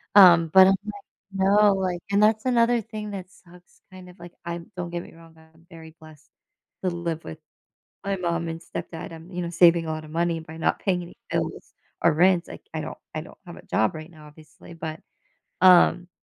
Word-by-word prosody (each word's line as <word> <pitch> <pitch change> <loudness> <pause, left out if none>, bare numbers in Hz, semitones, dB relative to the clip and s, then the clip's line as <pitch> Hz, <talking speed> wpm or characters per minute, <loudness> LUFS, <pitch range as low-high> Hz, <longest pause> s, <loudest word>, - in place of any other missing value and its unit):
Um, 170 -5 +8
but 190 0 +9
I'm 195 - +4
like, 205 -1 -8 0.3
"No, 200 +1 +4
like" 185 -2 -2
and 200 - +3
that's 215 +1 +2
another 240 -1 +3
thing 210 0 -7
that 185 -2 -7
sucks 180 0 -21
kind 185 -1 -12
of 180 - -17
like, 175 0 -11
I'm 170 +1 -6
don't 175 -1 -5
get 175 0 -3
me - - -15
wrong, 165 0 -17
I'm 160 +1 -22
very 160 -1 -13
blessed 155 -1 -17 0.5
to 185 - +1
live 170 -2 -4
with 160 - -8 0.7
my 195 -1 -1
mom 170 -1 -2
and 165 - -5
stepdad. 165 0 -7
I'm, 165 +3 -12
you 180 - -4
know, 170 - -4
saving 170 -1 +5
a - - -2
lotta 155 -1 -6
money 170 +1 -1
by 160 0 -11
not 165 - 0
paying 180 -3 -1
any 170 - -13
bills - - -3 0.3
or - - +5
rents. 175 +2 +3
Like, - - -10
I - - -3
don't - - -7 0.2
I - - -2
don't - - -14
have - - -10
a - - -14
job 110 +5 +1
right 155 +2 -9
now, 155 -2 -15
obviously, 155 +3 -16
but, 160 -1 -6 0.6
um, 180 -1 +6
175 Hz, 210 wpm, -24 LUFS, 165-190 Hz, 0.7 s, but